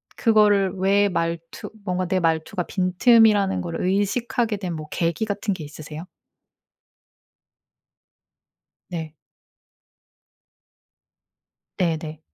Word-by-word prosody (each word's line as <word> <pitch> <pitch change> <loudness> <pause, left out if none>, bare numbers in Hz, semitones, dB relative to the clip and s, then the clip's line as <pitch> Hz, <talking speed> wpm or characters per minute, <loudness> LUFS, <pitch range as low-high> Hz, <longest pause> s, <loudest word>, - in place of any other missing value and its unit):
그거를 210 -4 +3
왜 200 +2 +3
말투 165 -1 -3 0.2
뭔가 185 -1 -1
내 185 0 +1
말투가 165 +2 0
빈틈이라는 200 +2 +3
걸 170 -1 -4
의식하게 210 +4 0
된 180 -4 -4
뭐 155 -1 -7
계기 170 +5 -1
같은 205 -1 -2
게 170 -4 -7
있으세요? 155 +2 -9 2.9
네. 160 -3 -6 2.6
네네. 160 -3 -2
185 Hz, 175 characters per minute, -23 LUFS, 165-205 Hz, 2.9 s, 그거를